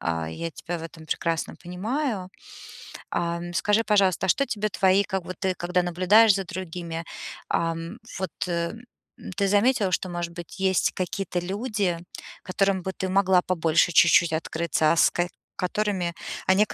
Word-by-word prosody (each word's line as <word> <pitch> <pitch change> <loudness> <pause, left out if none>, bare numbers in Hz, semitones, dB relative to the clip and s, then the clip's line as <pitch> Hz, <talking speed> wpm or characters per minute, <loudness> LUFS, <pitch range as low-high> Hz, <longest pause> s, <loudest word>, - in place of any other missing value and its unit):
а, 80 -1 -2
я 165 - -4
тебя 170 +2 -5
в - - -9
этом 160 -1 -10
прекрасно 165 0 -1
понимаю. 205 - -2 0.8
Ам, 170 0 -2
скажи, 210 +3 +3
пожалуйста, 200 -4 +2
а - - -1
что 275 - +3
тебе 215 -4 -2
твои 190 0 +3
как 190 -3 -3
бы 185 - -6
ты, 185 +1 -2
когда 180 +1 0
наблюдаешь 185 +5 +5
за 195 - -1
другими, 170 -2 -5 0.5
ам, 165 +4 -1 0.2
вот 190 -4 -3 1.1
ты 200 -1 +2
заметила, 205 -1 +3
что, 185 +1 -1
может 175 -1 -4
быть, 175 +2 -9
есть 190 - +2
какие-то 185 0 -2
люди, 195 -1 -1 0.5
которым 195 -1 0
бы 190 +1 -3
ты 190 - -3
могла 190 -1 +4
побольше 170 -1 +2
чуть-чуть 170 0 +5
открыться, 160 -1 +1
а - - +3
с - - +6
ка 175 0 -1 0.3
которыми, 185 -2 -1 0.3
а 190 - +6
нек 210 +1 +2
185 Hz, 160 wpm, -25 LUFS, 170-195 Hz, 1.1 s, с